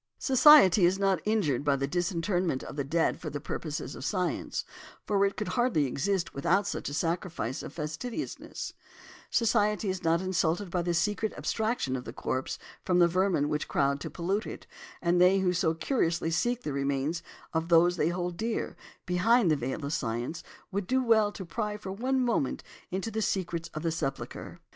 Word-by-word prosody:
Society 260 - +7
is 180 +2 +4
not 195 -3 +1
injured 180 - +1
by 145 -1 +3
the 135 0 -1
disinterment 175 -1 -1
of - - -8
the 145 - -1
dead 160 +4 +1
for 155 - -5
the 145 - -4
purposes 150 -2 -4
of 120 - -8
science, 180 +2 -2 0.4
for 200 -1 +2
it 195 - -6
could 210 - -3
hardly 240 - +2
exist 170 +8 -1
without 175 +8 +2
such - - -3
a - - -6
sacrifice 165 -6 -2
of - - -7
fastidiousness; 160 - -5 0.6
society 210 -3 +2
is 185 -1 -3
not 165 0 +3
insulted 180 0 0
by 180 -2 0
the 175 0 -1
secret 210 +5 0
abstraction 220 - -1
of 125 - -4
the - - -8
corpse 130 0 -3 0.3
from 180 - +2
the 175 -1 +6
vermin 180 -4 +1
which 150 0 -2
crowd 140 0 +1
to - - -5
pollute 190 +5 -2
it, - - -8 0.4
and 175 0 +3
they 185 +2 +6
who 185 -2 +2
so 165 -2 +1
curiously 165 - 0
seek 240 +8 0
the 150 - -3
remains 140 +4 -1 0.3
of 160 0 0
those 175 +1 +5
they 160 -2 +1
hold 175 0 -3
dear, 225 +3 -2 0.3
behind 185 +2 +3
the - - +4
veil 135 +2 -3
of 145 - -2
science, 120 +6 -2 0.3
would 195 -1 -2
do 260 0 +2
well 220 -3 +4
to 190 - -7
pry 210 +4 -3
for 195 -2 -7
one 255 +7 0
moment 235 - 0 0.3
into 195 +5 -3
the 220 - -2
secrets 170 -5 -2
of 155 - -4
the 165 - +1
sepulchre. 140 -5 -4
175 Hz, 185 wpm, -29 LUFS, 155-205 Hz, 0.6 s, Society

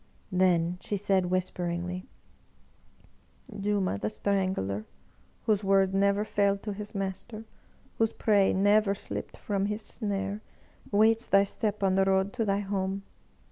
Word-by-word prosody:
Then 180 -1 +2
she 205 - -2
said 190 -2 +1
whisperingly: 180 0 -2 1.5
"Juma 200 - 0
the 105 - -1
Strangler, 185 - -1 0.6
whose 210 -2 +1
word 195 -1 +3
never 200 +1 +2
failed 200 -2 +1
to 210 - -3
his 210 +1 -8
master, 195 +3 -4 0.5
whose 225 0 +3
prey 205 -3 +3
never 205 +1 +3
slipped - - -6
from 200 -1 -1
his 210 +1 -3
snare, 200 -1 -3 0.5
waits 220 +3 +4
thy 195 0 +5
step 205 +1 -2
on 190 -1 +3
the 195 0 +3
road 190 +1 +2
to 230 -3 -1
thy 200 0 +1
home 195 -1 -2
195 Hz, 135 wpm, -28 LUFS, 190-205 Hz, 1.5 s, thy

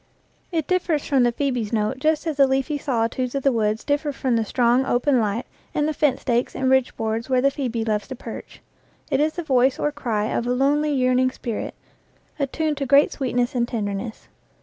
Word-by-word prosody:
It 325 -4 -1
differs 350 -4 0
from 275 -3 +2
the 240 0 +4
phcebe's 245 -4 -2
note 220 +3 0
just 310 +2 +1
as 315 -3 -2
the 275 -1 +6
leafy 270 +2 0
solitudes 250 0 -1
of 275 - -1
the 275 - +4
woods 215 -2 0
differ 290 +1 0
from 260 -3 -1
the 225 - +2
strong, 240 +3 +2
open 260 +1 +2
light 215 +1 -1 0.3
and 295 0 +1
the 310 - 0
fence 290 -4 +1
stakes 240 0 0
and 260 0 +1
ridge 265 -1 +2
boards 225 +2 -2
where 255 -1 +3
the 275 +2 +3
phoebe 240 -5 -2
loves 210 -2 -1
to 260 - -6
perch. - - -9 0.5
It 270 - +2
is 310 +1 +2
the 345 - -4
voice 260 -3 +3
or 295 - 0
cry 235 -8 -2
of 235 - -1
a 245 - +1
lonely, 290 +4 +2
yearning 255 -1 +2
spirit, 235 -3 -5 0.6
attuned 295 +2 -1
to 275 -1 -2
great 280 +3 +5
sweetness 245 -3 -1
and 240 -2 0
tenderness. 215 -1 -4
260 Hz, 205 wpm, -23 LUFS, 235-285 Hz, 0.6 s, the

